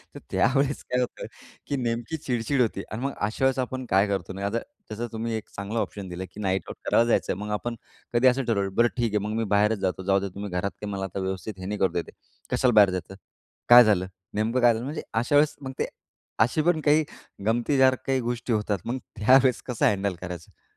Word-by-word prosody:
तर - - -7
त्यावेळेस 135 +2 +1
काय 125 - +2
होतं 125 - -4 0.4
की 140 - -1
नेमकी 120 +5 -2
चिडचिड 130 -2 -1
होती 105 -4 0
आणि 110 +3 -4
मग 140 - -1
अशा 110 +6 0
वेळेस 135 0 +2
आपण 130 0 -3
काय 95 +2 +4
करतो 95 -2 -3
ना, 100 +1 -4
आता 105 +3 0 0.3
तसा 115 +3 -3
तुम्ही 115 +1 -3
एक 110 - -6
चांगला 100 +3 -3
ऑप्शन 100 -3 -4
दिलं 90 +1 -5
की 105 - -10
नाईट 95 -1 0
आउट - - -7
करायला 115 - +4
जायचं. - - +2
मग 105 +1 -5
आपण 115 +3 -2 0.4
कधी 120 +2 +4
असं 130 +1 +3
ठरवलं 100 -4 0
"बरं 120 0 +5
ठीक 115 -3 0
आहे - - +3
मग 110 - -3
मी 115 - +1
बाहेरच 105 0 +3
जातो, 95 0 -2
जाऊदे 100 0 +1
तुम्ही 100 0 -5
घरात 90 +2 -1
काय 105 - -4
मला 95 -1 -3
व्यवस्थित 95 +1 -4
हे 95 - -7
नाही 105 +1 -3
करू 95 -3 +2
देत 85 -1 -1
आहे." - - -18 0.4
"कशाला 125 - +3
बाहेर 105 -3 +7
जायचं? 95 +1 -5 0.5
काय 120 0 +11
झालं? 100 -4 +2 0.3
नेमकं 115 +4 0
काय 120 -1 +6
झालं?" 115 +2 -4
म्हणजे 150 +2 -4
अशा 120 +6 +1
वेळेस 150 +1 +4
मग 135 -1 -5
ते - - 0 0.6
अशी 125 +7 0
पण 170 -2 +2
काही 150 +1 +4 0.4
गमतीदार 130 +3 +3
काही 135 -1 +2
गोष्टी 120 0 -2
होतात. 105 -1 0
मग 120 +3 -2 0.2
त्यावेळेस 130 +4 +4
कसं 125 -3 0
हँडल 100 -2 0
करायचं? 90 -3 -9
110 Hz, 220 wpm, -26 LUFS, 100-125 Hz, 0.6 s, काय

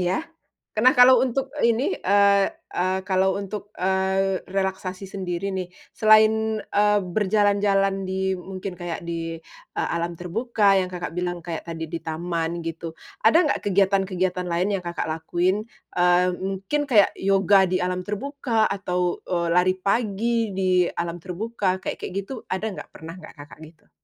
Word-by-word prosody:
iya? 180 +1 +1 0.6
K 220 - +1
nah, 255 - +8
kalau 250 0 +8
untuk 265 +2 -2 0.2
ini, 235 +3 +1
eee 200 0 +3 0.2
eee, 185 +1 0
kalau 190 0 +1
untuk, 200 +1 -6
eee, 190 0 0
relaksasi 190 0 -3
sendiri 190 0 -3
nih, 185 -2 -4 0.2
selain, 220 0 +4
eee, 210 0 +2
berjalan-jalan 195 0 +1
di 190 0 -1
mungkin 185 0 -7
kayak 175 -1 -5
di, 165 -1 -5 0.3
eee, - - -2
alam 170 +1 -2
terbuka 200 +3 +1
yang 185 - +2
Kakak 180 -1 -6
bilang 175 -1 -2
kayak 165 -1 -6
tadi 160 -1 -6
di 170 - -3
taman 165 +1 -3
gitu. 165 0 -6 0.3
Ada 225 +8 +6
nggak - - 0
kegiatan-kegiatan 190 -2 +1
lain 180 +4 0
yang 185 - -8
Kakak 170 -1 -3
lakuin? 175 +6 -1 0.3
Eee, 180 +1 +4
mungkin 195 +10 -2
kayak 220 -8 +5
yoga 195 0 +4
di 185 0 -1
alam 180 0 -2
terbuka, 230 0 -1
atau, 180 -3 -1
eee, 170 -2 -1
lari 180 +2 +3
pagi 225 +1 0
di 185 -1 +2
alam 170 0 -3
terbuka, 190 +2 -2
kayak-kayak - - -5
gitu 225 +4 -9
ada 215 +4 -2
nggak? 195 - -9
Pernah 165 +2 -9
nggak, 180 - -12
Kakak, 145 -1 -13
gitu? 160 +1 -20
190 Hz, 150 wpm, -24 LUFS, 180-205 Hz, 0.6 s, nah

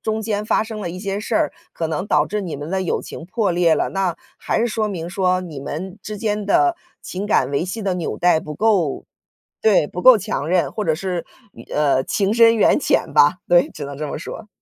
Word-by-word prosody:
中 220 0 -2
间 210 -1 -2
发 - - +2
生 220 -1 -7
了 180 - -3
一 180 - -7
些 200 0 -3
事 220 +1 -4
儿， - - +2 0.2
可 165 - -3
能 165 +5 -3
导 - - +3
致 210 0 -3
你 180 -5 -5
们 145 +3 -6
的 190 0 0
友 180 - -1
情 165 - -9
破 210 +1 0
裂 170 -2 +3
了， - - 0
那 190 -3 -1 0.2
还 - - -1
是 240 - +1
说 215 -1 -1
明， 175 -4 -5
说， 185 -1 +1
你 165 -6 -8
们 185 +8 -6
之 210 0 -6
间 210 -1 -2
的 350 - +3 0.3
情 190 +3 -5
感 135 - +2
维 140 +4 0
系 200 +5 -5
的 195 -2 0
纽 175 -2 -3
带 175 -2 +3
不 150 -1 -7
够 190 -7 +1 0.6
对， 205 -9 +4
不 180 - -6
够 255 0 +8
强 205 -7 -3
韧， 180 0 +1
或 215 - -3
者 160 - +2
是， 180 0 -3 0.3
缘 - - -14
呃， 140 -3 +2
情 200 0 0
深 230 0 +6
缘 220 - +4
浅 - - +1
吧。 150 +6 +5
对， 175 0 +4
只 150 - -7
能 140 0 -7
这 150 - -4
么 - - -4
说。 210 +6 -8
185 Hz, 255 characters per minute, -20 LUFS, 165-210 Hz, 0.6 s, 够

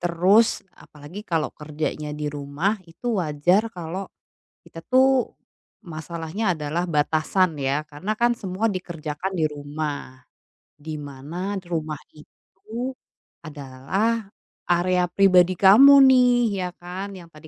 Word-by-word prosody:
terus 180 +6 +4 0.2
apalagi 150 +7 -12
kalau 160 -3 +1
kerjanya 150 0 -5
di 150 - -5
rumah 145 +7 -1 0.2
itu 165 +9 -11
wajar 170 +6 +2
kalau, 175 +3 -5 0.6
kita 165 - -10
tuh, 260 0 +4 0.6
masalahnya 165 +5 -5
adalah 155 +3 -2
batasan 155 +5 +2
ya, 140 +3 -1
karena 150 +8 -5
kan 240 0 +4
semua 190 +2 -2
dikerjakan 170 0 -5
di - - +2
rumah, 145 -2 -6 0.7
di 155 -1 -4
mana 145 +3 -9 0.2
di 180 - -27
rumah 155 -3 -3 0.2
itu, 220 +11 -8 0.5
adalah 155 - -2 0.5
area 180 +1 +2
pribadi 185 -2 +5
kamu 210 +10 +8 0.2
nih, 250 -1 +5 0.3
ya 180 - -1
kan? 180 +3 -6
Yang 170 -2 -12
tadi 155 +1 -14
170 Hz, 120 wpm, -23 LUFS, 150-195 Hz, 0.7 s, kamu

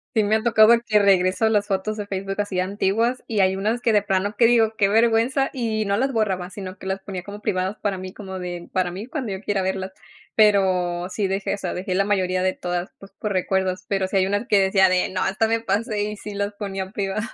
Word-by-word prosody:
Sí 220 - +3
me 215 +2 +3
ha 220 - -2
tocado 225 -1 +6
que 215 - +4
regreso 195 +1 +3
a - - +4
las 210 -2 +1
fotos 195 +2 -1
de 210 -1 -5
Facebook 195 0 -4
así 205 -3 -1
antiguas, 205 +6 0
y 215 -3 0
hay 190 0 +3
unas 215 +5 -1
que 235 -3 +1
de 205 - +4
plano 200 +1 -1
que 235 - +4
digo, 225 -2 +3
qué 200 -2 +2
vergüenza, 230 +5 +3
y 220 -4 -1
no 200 0 +1
las 265 +5 0
borraba, 190 -6 -1
sino 190 -1 -7
que 190 - -11
las 190 0 -2
ponía 190 -2 -6
como 205 +2 -9
privadas 190 0 -2
para 200 -2 -1
mí, 185 0 -7
como 190 -2 -7
de 175 -1 -6
para 185 -1 +1
mí, 190 +5 -7
cuando 255 -5 -4
yo 190 - -5
quiera 205 -2 -1
verlas. 190 0 -3 0.4
Pero, 185 -4 +2
sí 195 +1 -2
dejé 195 +1 -1
esa, 190 -3 -4
dejé 185 0 -3
la 195 +2 +2
mayoría 185 -2 0
de 185 0 +2
todas, 175 0 -4
pues, 195 0 -14
por 210 - -2
recuerdos, 185 -1 -1
pero, 195 -1 0
sí 190 - -3
hay 190 - +2
unas 205 +4 -1
que 205 - +4
decía 190 -1 +4
de 185 0 +2
no, 185 0 -1
esta 215 +3 +1
me 230 0 +1
pasé 210 0 -1
y 210 +1 -3
sí 210 -1 -8
las 200 +1 -2
ponía 195 -2 -5
privadas. 200 +1 -2
200 Hz, 245 wpm, -23 LUFS, 190-215 Hz, 0.4 s, tocado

